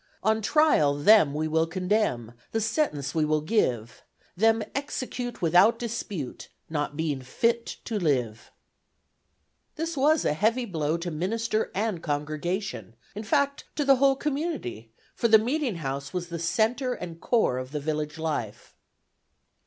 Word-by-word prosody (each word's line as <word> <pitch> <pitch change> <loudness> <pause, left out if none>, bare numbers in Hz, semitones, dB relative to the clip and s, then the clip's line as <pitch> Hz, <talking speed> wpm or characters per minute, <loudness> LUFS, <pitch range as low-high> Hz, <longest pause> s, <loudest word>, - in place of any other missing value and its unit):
On 220 +2 +2
trial 220 - +3
them 155 +1 +6
we 155 +1 -1
will 160 +1 +1
condemn, 180 - 0 0.2
The 225 - +1
sentence 210 - -1
we 160 - +1
will 155 0 +1
give: 125 - -1 0.3
Them 225 +3 +3
execute 250 -5 -4
without 180 +7 +5
dispute, 210 - -5 0.2
Not 145 -1 -2
being 150 -4 -1
fit 230 - -1
to 220 -2 -2
live. 125 - -1 1.3
This 330 +1 -3
was 300 +3 +3
a - - +2
heavy 230 +9 +1
blow 160 -5 -1
to 170 +1 -4
minister 215 +7 -1
and 205 -4 -1
congregation, 155 - -3 0.2
in 205 - -5
fact 280 +4 0
to 295 - 0
the 275 -1 +6
whole 275 +1 +4
community; 275 - -3 0.2
for 235 - +1
the 220 -1 +8
meeting 250 - -1
house 135 -3 -4
was 180 -1 -3
the 170 -1 -5
centre 225 - 0
and 170 -2 -8
core 220 - +2
of 130 +1 -7
the 150 - -2
village 150 +1 -3
life. 150 -10 -4
180 Hz, 145 wpm, -26 LUFS, 150-230 Hz, 1.3 s, the